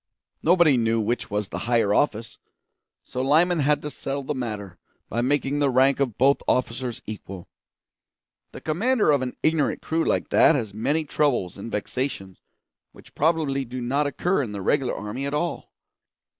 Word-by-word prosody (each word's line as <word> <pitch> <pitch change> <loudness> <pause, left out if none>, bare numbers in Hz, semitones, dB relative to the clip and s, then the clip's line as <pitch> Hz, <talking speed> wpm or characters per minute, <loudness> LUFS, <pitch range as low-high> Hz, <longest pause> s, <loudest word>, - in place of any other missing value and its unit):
Nobody 170 -5 +4
knew 115 -1 +1
which 115 +3 -2
was 105 -1 -2
the - - -5
higher 115 -4 +3
office; 115 -3 0 0.6
so 125 - -5
Lyman 160 +6 +3
had 150 +1 +2
to 150 - -4
settle 140 0 -4
the 150 - -2
matter 105 - -5 0.3
by 120 - -1
making 140 +2 0
the 145 -1 +3
rank 130 +2 +3
of 130 -6 -1
both 135 +2 +3
officers 125 -1 -1
equal. 95 -4 -8 1.0
The - - -10
commander 210 +4 +2
of 140 -2 +2
an 125 -1 -4
ignorant 155 -3 +1
crew 160 +1 0
like - - 0
that 160 - +5
has 110 -7 -3
many 145 +9 0
troubles 140 -12 0
and 100 +3 -8
vexations 105 -3 -4 0.5
which - - -17
probably 150 -3 +1
do 130 +1 -6
not 140 +4 0
occur 175 +4 0
in 115 -6 -4
the 100 -2 -5
regular 135 +3 +1
army 105 +7 -4
at 140 - -2
all. 170 +3 -3
135 Hz, 170 wpm, -24 LUFS, 115-150 Hz, 1.0 s, that